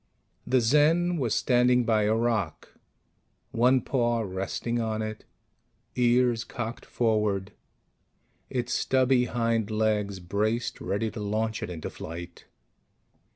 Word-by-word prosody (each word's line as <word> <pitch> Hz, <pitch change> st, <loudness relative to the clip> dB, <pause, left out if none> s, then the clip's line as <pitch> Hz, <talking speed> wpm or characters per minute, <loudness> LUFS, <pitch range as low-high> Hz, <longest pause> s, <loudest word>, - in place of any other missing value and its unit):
The 130 Hz, -1 st, +3 dB
Zen 160 Hz, +8 st, +3 dB
was 125 Hz, -7 st, 0 dB
standing 125 Hz, 0 st, +3 dB
by 110 Hz, -2 st, +2 dB
a 110 Hz, +1 st, +2 dB
rock, 110 Hz, -8 st, -1 dB, 0.8 s
one 125 Hz, +3 st, +3 dB
paw 120 Hz, -2 st, 0 dB
resting 100 Hz, +4 st, -3 dB
on 110 Hz, -1 st, -2 dB
it, 110 Hz, 0 st, -6 dB, 0.7 s
ears 120 Hz, -1 st, +3 dB
cocked 120 Hz, -1 st, -6 dB
forward, 105 Hz, -4 st, 0 dB, 1.0 s
its 125 Hz, -1 st, -2 dB
stubby 130 Hz, -1 st, +2 dB
hind 115 Hz, -2 st, 0 dB
legs 105 Hz, -2 st, 0 dB
braced 105 Hz, +6 st, -2 dB
ready 105 Hz, +2 st, -1 dB
to -, -, -7 dB
launch 110 Hz, +1 st, -2 dB
it -, -, -4 dB
into 85 Hz, -3 st, -6 dB
flight. 85 Hz, +2 st, -9 dB
115 Hz, 115 wpm, -27 LUFS, 105-125 Hz, 1.0 s, The